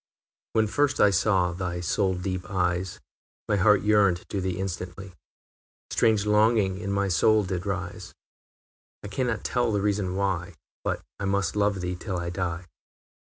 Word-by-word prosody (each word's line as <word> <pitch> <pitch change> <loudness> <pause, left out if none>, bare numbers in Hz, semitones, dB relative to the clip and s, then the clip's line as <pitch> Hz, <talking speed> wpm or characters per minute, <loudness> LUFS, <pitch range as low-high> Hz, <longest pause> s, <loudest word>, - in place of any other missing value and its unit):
I. - - -13
When 110 - +5
first 140 +5 +1
I 105 - +6
saw 95 -3 +2
thy 90 -1 -3
soul 95 +3 0
deep 90 -1 -4
eyes, 90 -1 -1 0.5
My 105 - +2
heart 105 +1 +4
yearned 100 -4 +3
to 100 - -2
thee 95 -1 -2
instantly, 95 0 -5 0.8
Strange 110 -3 +3
longing 105 -2 +3
in 100 -1 -3
my 100 0 +1
soul 105 +4 +3
did 95 0 -4
rise; 95 -2 -4 0.9
I 105 - -6
cannot 120 -1 -1
tell 120 -2 +1
the 105 - +1
reason 100 -2 0
why, 95 -2 -1 0.3
But - - -2 0.2
I 100 - -2
must 100 +1 0
love 100 -2 +1
thee 90 0 -2
till 95 +1 -4
I 85 0 -3
die. 90 -1 -3
95 Hz, 160 wpm, -26 LUFS, 90-105 Hz, 0.9 s, I